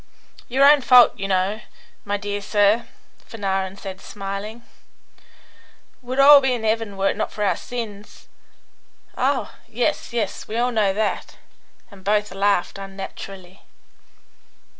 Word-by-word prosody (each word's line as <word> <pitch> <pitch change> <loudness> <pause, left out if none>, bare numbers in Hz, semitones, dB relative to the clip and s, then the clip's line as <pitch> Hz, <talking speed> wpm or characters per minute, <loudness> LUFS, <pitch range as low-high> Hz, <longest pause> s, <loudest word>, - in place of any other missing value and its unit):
"Your 270 +3 +3
own 290 0 +7
fault, 250 -1 +7
you 195 - -2
know, 195 +3 0 0.4
my 205 0 -1
dear 205 0 -4
sir," 205 +3 +2 0.4
Fanarin 195 -3 -3
said, 190 -1 -8
smiling. 205 +3 -7 1.4
"We'd 255 +1 -5
all 280 +1 +9
be 265 -1 +1
in 225 -2 -5
'eaven 220 -2 -1
were 195 0 +2
it - - -6
not - - -3
for 210 - -4
hour 200 - +2
sins." 215 -4 -8 0.9
"Oh, - - -1
yes, - - -2
yes; 225 -5 -3
we 220 - -4
all 245 +1 +1
know 215 -4 +2
that," 210 +2 -3 0.5
and 195 -2 -15
both 210 +1 +1
laughed 195 -1 0
un 195 0 -9
naturally. 190 -1 -9
205 Hz, 140 wpm, -22 LUFS, 195-230 Hz, 1.4 s, all